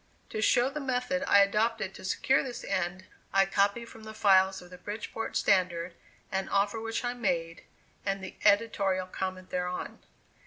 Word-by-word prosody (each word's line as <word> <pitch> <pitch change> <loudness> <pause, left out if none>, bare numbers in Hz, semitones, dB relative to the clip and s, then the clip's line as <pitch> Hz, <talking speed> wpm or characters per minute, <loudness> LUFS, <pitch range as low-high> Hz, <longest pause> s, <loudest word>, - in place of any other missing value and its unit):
To 215 - -2
show 245 +4 +3
the 300 - -4
method 265 0 -1
I 200 - +7
adopted 210 0 +1
to - - -11
secure 260 +7 +2
this 255 -3 -6
end, 185 +1 -2 0.3
I 195 0 +4
copy 200 +4 +1
from 225 -1 -13
the 220 0 -9
files 190 -2 +4
of 180 0 -14
the 180 - -11
Bridgeport 215 +3 -4
Standard, 180 -3 +1 0.4
an 190 0 -2
offer 200 +2 +1
which 225 +2 -3
I 245 - 0
made, 175 -8 -2 0.4
and 195 -1 -2
the 190 - -7
editorial 200 -3 +3
comment 185 0 -5
thereon. 180 0 -3
200 Hz, 165 wpm, -29 LUFS, 185-225 Hz, 0.4 s, I